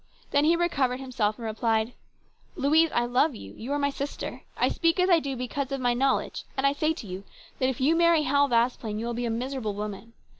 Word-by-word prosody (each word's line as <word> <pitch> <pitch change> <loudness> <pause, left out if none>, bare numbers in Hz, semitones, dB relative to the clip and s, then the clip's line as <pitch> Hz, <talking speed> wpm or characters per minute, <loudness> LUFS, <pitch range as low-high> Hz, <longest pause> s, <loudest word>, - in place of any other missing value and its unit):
Then 285 +1 +3
he 330 +2 +5
recovered 280 -7 0
himself 240 -6 -1
and 230 - -7
replied: 225 +1 0 0.3
" - - -37
Louise, 315 +4 +4
I 240 - +1
love 250 +4 +2
you. 100 - -10
You 240 +5 -7
are - - +1
my 280 0 +1
sister. 280 +1 -5 0.2
I - - +3
speak 335 +2 +1
as 365 +1 +3
I 340 - +6
do 275 -3 -4
because 260 +2 -3
of 275 - -2
my 245 -1 +2
knowledge, 265 +2 0
and 265 - +1
I 275 - +4
say 310 +2 +1
to 320 - -6
you 185 0 -7 0.4
that 260 - +2
if 265 - -4
you 290 +5 +3
marry 335 -2 +4
Hal 285 0 +3
Vasplaine 235 -2 +1
you 225 - -3
will 240 - -2
be 240 +1 -2
a - - -1
miserable 235 -2 -3
woman. 210 +2 -6
260 Hz, 235 wpm, -27 LUFS, 230-285 Hz, 0.4 s, I